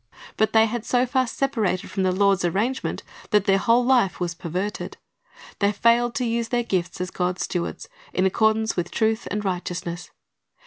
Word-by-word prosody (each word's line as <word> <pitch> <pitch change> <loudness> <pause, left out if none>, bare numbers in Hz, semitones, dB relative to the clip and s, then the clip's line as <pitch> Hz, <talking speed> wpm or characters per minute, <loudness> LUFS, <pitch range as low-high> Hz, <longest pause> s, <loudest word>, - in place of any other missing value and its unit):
But 220 0 +2
they 220 0 +6
had 225 0 -3
so 245 +1 +2
far 255 0 +1
separated 225 -8 -1
from 195 - -2
the 185 -1 +2
Lord's 195 0 +2
arrangement 210 +10 -1 0.3
that 210 -3 +3
their 195 0 +3
whole 235 +4 +3
life 245 -7 +3
was 175 -1 -2
perverted. 185 +4 -4 0.6
They 200 0 +3
failed 235 +3 +2
to 250 - 0
use 230 0 -1
their 240 +1 0
gifts 185 -6 -2
as 180 0 -3
God's 180 0 -1
stewards, 175 -2 -4 0.2
in 185 - +1
accordance 220 +3 +2
wdth 175 -1 -2
truth 220 +3 0
and 210 0 -3
righteousness. 175 -1 -4
210 Hz, 175 wpm, -24 LUFS, 185-235 Hz, 0.6 s, they